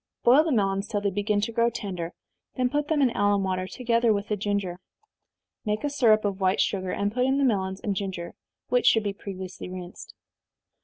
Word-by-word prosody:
Boil 265 +6 +6
the 325 - -1
melons 195 -3 +1
till 205 - -1
they 200 -1 -1
begin 205 +1 0
to 225 +3 -2
grow 235 +1 +2
tender, 190 -7 -5 0.4
then 255 -1 0
put 295 0 0
them 300 -2 +2
in 250 - +3
alum 205 -2 +2
water, 185 -1 -1
together 235 0 +1
with 205 0 -1
the 210 - +1
ginger. 200 -3 -2 0.8
Make 210 +2 -2
a 290 - -1
syrup 220 -7 +4
of 200 -1 -2
white 190 0 +2
sugar, 190 -2 0
and 205 +2 -1
put 250 +1 +1
in 265 +1 +2
the 280 - +2
melons 190 -6 0
and 200 -2 -1
ginger, 185 -3 -4 0.4
(which 250 0 +2
should 225 - +5
be 200 -1 -2
previously 190 -2 -7
rinsed.) 180 -1 -9
205 Hz, 205 wpm, -26 LUFS, 190-235 Hz, 0.8 s, Boil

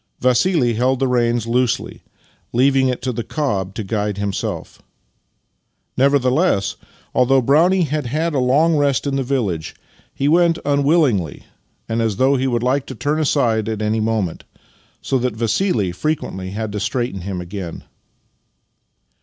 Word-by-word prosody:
Vassili 125 0 +2
held 130 +4 +1
the 135 +1 0
reins 120 -2 +1
loosely, 120 +1 -1 0.5
leaving 130 +2 +3
it 125 -1 -2
to 130 - -1
the 115 - -3
cob 105 - -2
to 110 - -3
guide 105 0 -2
himself. 100 -1 -4 1.1
Nevertheless, 135 - +2 0.4
although 130 +1 +4
Brownie 165 +9 +3
had 150 -3 -2
had 155 +6 -1
a 140 - +1
long 150 +6 +3
rest 140 -2 +1
in 140 -1 -1
the 135 - 0
village, 115 - -2 0.4
he 140 - -2
went 170 +2 +4
Master - - -11
and 140 - +3
Man 140 - 0
33 155 - +5
unwillingly, 105 - +1 0.4
and 115 +1 -1
as 110 -3 0
though 130 +6 +3
lie 135 -1 +1
would 120 -2 0
like 130 +2 0
to 130 - -7
turn 145 +6 -1
aside 115 -8 +1
at 110 -1 -3
any 110 +1 0
moment, 110 -6 -1 0.6
so 135 - 0
that 125 -2 -1
Vassili 115 - 0
frequently 95 - -3
had 105 +2 -4
to 105 - -3
straighten 120 -2 -2
him 95 0 -4
again. 90 -1 -7
125 Hz, 160 wpm, -19 LUFS, 110-140 Hz, 1.1 s, 33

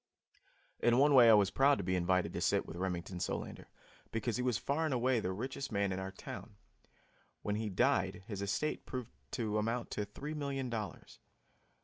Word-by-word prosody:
In 120 0 +4
one 145 +2 +5
way 120 -3 +9
I 110 - +9
was 100 -2 +4
proud 140 +1 +4
to 100 - -3
be 95 +1 0
invited 90 +1 +1
to - - -3
sit - - +2
with - - -8
Remington 90 0 -3
Solander, - - -4 0.4
because 115 0 -1
he - - -1
was 125 -3 +1
far 145 +4 -1
and 155 -5 +1
away 125 0 +2
the 95 -3 -2
richest 130 +7 -4
man 100 -2 +1
in 95 - -2
our 95 0 -4
town. 100 +1 -9 0.9
When 105 - -1
he 110 +1 -2
died, 95 0 +1
his 100 -2 -5
estate 100 +10 -2
proved 125 -3 -5 0.2
to 110 -2 0
amount 115 +2 -2
to 105 - -2
three 140 +9 -6
million 140 -4 -3
dollars. 105 -6 -6
110 Hz, 195 wpm, -34 LUFS, 95-130 Hz, 0.9 s, way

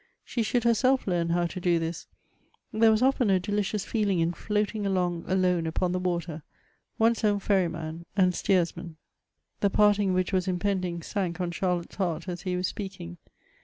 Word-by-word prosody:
She 240 - -2
should 235 +2 0
herself 255 +3 +3
learn 175 -3 0
how 175 +1 +1
to 185 +2 -5
do 175 -1 +2
this; 165 +1 -4 0.7
there 225 +1 +5
was 220 +2 +3
often 260 -4 +3
a 190 -1 +4
delicious 205 +1 -2
feeling 205 -4 0
in 165 +1 +1
floating 210 +2 -2
along 180 -3 -1
alone 180 -3 +1
upon 175 +2 -1
the 180 - -1
water, 170 -3 -2 0.6
one's 225 +1 +2
own 205 -1 +3
ferryman 170 -4 -1
and 185 -2 +4
steersman. 170 -3 -1 0.6
The 200 - +2
parting 205 -2 +3
which 185 +1 0
was 185 0 +1
impending, 180 -2 -1
sank 180 -3 -3
on 175 -1 -1
Charlotte's 175 -1 -2
heart 180 -3 -2
as 175 -1 -5
he 185 -2 -2
was 180 +1 -1
speaking. 190 - -7
185 Hz, 170 wpm, -27 LUFS, 175-205 Hz, 0.7 s, there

